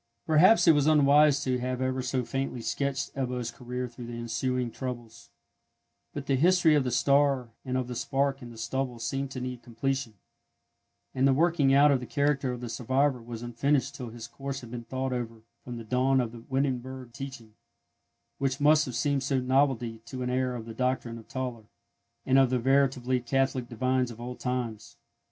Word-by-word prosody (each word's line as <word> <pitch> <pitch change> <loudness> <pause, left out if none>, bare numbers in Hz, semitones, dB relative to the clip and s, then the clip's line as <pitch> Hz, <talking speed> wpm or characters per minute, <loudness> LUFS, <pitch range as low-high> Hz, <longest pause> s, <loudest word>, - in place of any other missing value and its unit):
Perhaps 175 +7 +5
it - - +10
was 145 -2 +3
unwise 145 -1 +5
to 130 -1 0
have 125 0 -2
ever 130 0 -1
so 130 0 -1
faintly 135 0 -3
sketched 140 +3 -2
Ebbo's 125 -3 -3
career 125 +1 -5
through 120 0 -10
the 120 0 -6
ensuing 120 +1 -2
troubles; 120 -2 -7 0.8
but 145 -1 -6
the 135 - +2
history 175 +1 +4
of 145 -2 +3
the 125 - -1
star 140 -1 +2
and 130 0 -2
of 130 -1 -2
the 125 - -5
spark 135 +3 -1
in 120 - -9
the 115 - -12
stubble 125 +2 -2
seemed 135 +4 -3
to 130 - -6
need 125 -1 -5
completion; 120 0 -3 1.0
and 130 +1 +3
the 135 - +4
working 160 -3 +3
out 140 +2 +6
of 135 - +3
the 125 - -8
character 140 -3 +1
of 125 -1 -6
the 120 - -5
survivor 130 +3 0
was 115 0 -7
unfinished 135 +4 0
till 125 -4 -7
his 115 0 -8
course 135 +3 -6
had 120 -2 -11
been 120 -1 -6
thought 130 +2 -2
over 115 -2 -5 0.2
from 120 -1 -7
the 115 - -7
dawn 130 +4 +2
of 120 -3 -1
the 115 -1 -10
Wittenberg 130 -2 -2
teaching, 130 -5 -8 0.9
which 135 0 -1
must 150 +1 +5
have 125 - -5
seemed 140 -2 0
no 135 -2 +2
novelty 125 -3 +1
to 130 +1 -5
an 125 - -2
heir 130 0 0
of 115 -2 -6
the 115 - -8
doctrine 125 -1 -1
of 110 - -15
Tauler, 125 -4 -5 0.6
and 135 +1 +5
of 135 -2 +4
the 130 - +1
veritably 130 0 +2
Catholic 130 0 0
divines 130 +1 0
of 115 -1 -10
old 125 +1 -7
times. 125 -4 -4
130 Hz, 195 wpm, -28 LUFS, 120-135 Hz, 1.0 s, it